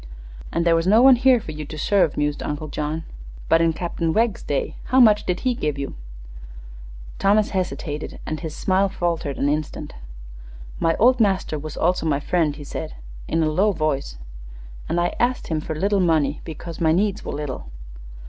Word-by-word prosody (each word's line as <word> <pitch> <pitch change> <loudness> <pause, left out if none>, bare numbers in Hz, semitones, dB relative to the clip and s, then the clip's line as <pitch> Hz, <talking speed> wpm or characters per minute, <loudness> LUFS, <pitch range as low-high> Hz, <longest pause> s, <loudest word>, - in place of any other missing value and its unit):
"And 170 0 0
there 170 -1 +5
was 165 +2 0
no 220 +5 +6
one 265 -1 +8
here 255 0 +4
for 180 - -8
you 155 0 -6
to 155 +1 -8
serve," 185 0 +2
mused 145 0 -1
Uncle 150 +1 -4
John. 155 +2 -3 0.5
"But 165 - +5
in 165 0 +3
Captain 165 0 -2
Wegg's 230 +1 +1
day, 140 -2 -2
how 260 - +3
much 215 -4 +5
did 180 0 -1
he 255 -1 +1
give 150 -10 -2
you?" 140 -1 -4 1.3
Thomas 205 +2 +3
hesitated, 175 -5 -3
and 155 - -3
his 160 -3 -6
smile 190 0 +1
wavered 165 -5 -1
an 140 - 0
instant. 150 0 -3 0.9
"My 165 0 +2
old 250 +3 +4
master 190 -7 +1
was 155 0 -7
also 175 -1 +1
my 150 - +2
old 140 - -4
friend," 160 -4 +1
said - - -6 0.3
he, - - -8
in 165 - +3
a 155 - +1
low 200 +6 +2
voice; 140 - -2 0.7
"an' 170 - 0
I 175 0 +1
ast 250 +1 0
him 155 -2 -1
fer 160 - -5
little 200 +5 +1
money 155 -5 +1
because 165 +1 -8
my 160 -1 +4
needs 205 +3 0
were - - -5
little." 140 - -5
165 Hz, 190 wpm, -22 LUFS, 150-200 Hz, 1.3 s, one